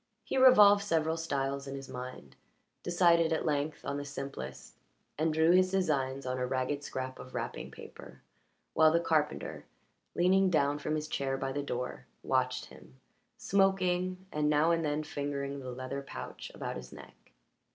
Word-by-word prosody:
He - - -4
revolved 210 -6 +7
several 160 -4 +1
styles 140 -4 -2
in 135 - -5
his 135 -1 -7
mind, 125 - -8 0.5
decided 170 -2 +3
at 160 - 0
length 150 0 -1
on 140 - -2
the 145 - -4
simplest, 135 - -7 0.4
and 160 +2 +1
drew 160 +2 +4
his 185 +1 +5
designs 140 -8 0
on 130 0 -2
a 125 - 0
ragged 130 +3 -1
scrap 130 -1 -5
of 130 - -10
wrapping - - -4
paper, - - -12 0.5
while 160 -1 +6
the 165 - +3
carpenter, 155 -3 -1 0.5
leaning 190 +2 +4
down 145 -3 +2
from 155 +1 -2
his 155 0 -3
chair 135 -3 -1
by 135 0 -3
the 145 +2 -2
door, 125 -3 -4 0.2
watched 130 -1 0
him, - - -16 0.4
smoking, 185 -1 +1
and 150 0 +1
now 150 +2 +4
and 165 -1 +1
then 150 0 -1
fingering 140 -1 -4
the 130 -1 -7
leather 130 +2 -5
pouch 135 - -8
about - - -4
his 60 -1 -10
neck. - - -15
145 Hz, 165 wpm, -31 LUFS, 135-170 Hz, 0.5 s, revolved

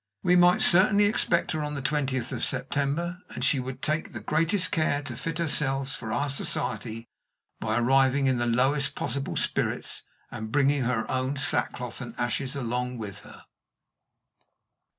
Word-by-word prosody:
We 180 - +4
might 180 0 +5
certainly 200 +3 +5
expect 180 -4 +1
her 155 - -2
on 150 0 -4
the 140 - -4
twentieth 135 -3 -1
of - - -4
September, 165 +6 0
and - - -6
she 140 - +3
would 130 +1 -7
take 155 +2 -1
the 110 - -5
greatest 165 - +1
care 145 -2 0
to - - -6
fit 165 -1 -4
herself 140 -4 +1
for 110 -2 -6
our 145 - 0
society 125 -5 -3 0.5
by 110 +1 -1
arriving 135 +3 +3
in 130 -2 +1
the 120 - 0
lowest 130 +5 +2
possible 140 -1 -3
spirits, - - 0 0.3
and 110 0 -6
bringing 140 0 +2
her 115 -2 0
own 130 +2 -1
sackcloth 130 -4 0
and 120 -2 -8
ashes 130 +3 -2
along 125 -1 -3
with 105 -4 -7
her. - - -15
135 Hz, 160 wpm, -26 LUFS, 125-155 Hz, 0.5 s, might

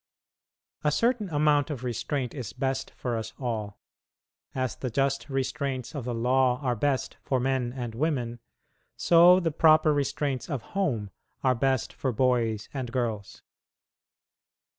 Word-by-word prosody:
A 150 - +3
certain 230 +2 +1
amount 150 -1 +2
of 135 -5 -5
restraint 125 +1 -2
is 125 -8 -6
best 135 +1 -2
for 120 -2 -3
us 110 -1 -4
all. 110 -5 -3 0.8
As 130 -2 -1
the 130 - -4
just 135 +4 0
restraints 135 -1 -2
of 140 -6 -5
the 125 - -2
law 125 +1 +2
are 125 -2 +1
best 135 +2 -1
for 130 - 0
men 130 -1 0
and 120 -3 -5
women, 120 -3 -1 0.6
so 175 +2 +7
the 165 -3 0
proper 155 0 +5
restraints 140 -1 -1
of 135 -7 -3
home 125 - -1 0.3
are 130 -1 +4
best 130 +1 0
for 130 - -2
boys 115 -3 +1
and 130 -4 -4
girls. 115 -5 -3
130 Hz, 140 wpm, -27 LUFS, 120-145 Hz, 0.8 s, so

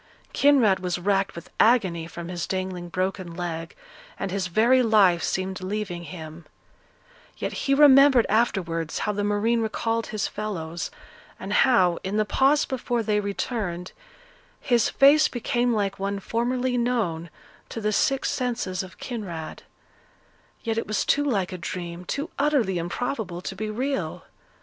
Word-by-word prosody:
Kinraid 260 -9 +4
was 180 -1 -2
racked 195 +2 0
with 170 - -10
agony 190 -9 +3
from 170 0 -8
his 175 -2 -4
dangling 185 -2 -4
broken 185 -1 -3
leg, 165 -2 -5 0.4
and 195 - -3
his 190 -1 -1
very 235 +8 +4
life 205 -7 +4
seemed 190 0 -2
leaving 185 -3 -4
him; 160 -1 -9 0.9
yet - - -3
he 275 - +1
remembered 275 -3 +7
afterwards 175 -7 0
how 210 - -1
the 205 0 -2
marine 210 +3 +1
recalled 225 +1 -1
his 215 -1 -2
fellows, 175 -6 -4 0.5
and 195 +2 -4
how, 185 -9 +4
in 195 +3 -2
the 215 - +2
pause 275 +7 +3
before 245 -2 -2
they 210 -1 +1
returned, 200 -3 -3 0.7
his 240 -3 +2
face 295 +3 +6
became 240 0 0
like 200 -4 -1
one 200 +1 -2
formerly 245 +4 -1
known 210 -9 -1 0.4
to - - -5
the 215 -1 -1
sick 270 +5 +1
senses 230 -8 -1
of 185 -1 -11
Kinraid; 185 -10 -6 1.0
yet 225 -1 -1
it - - -5
was 210 -3 0
too 290 - +2
like 205 -10 0
a 185 - -6
dream, 175 +1 -6
too 285 - -3
utterly 270 - +2
improbable 180 0 -3
to 190 - -6
be 215 +2 -4
real. 265 +5 -3
205 Hz, 150 wpm, -25 LUFS, 180-240 Hz, 1.0 s, remembered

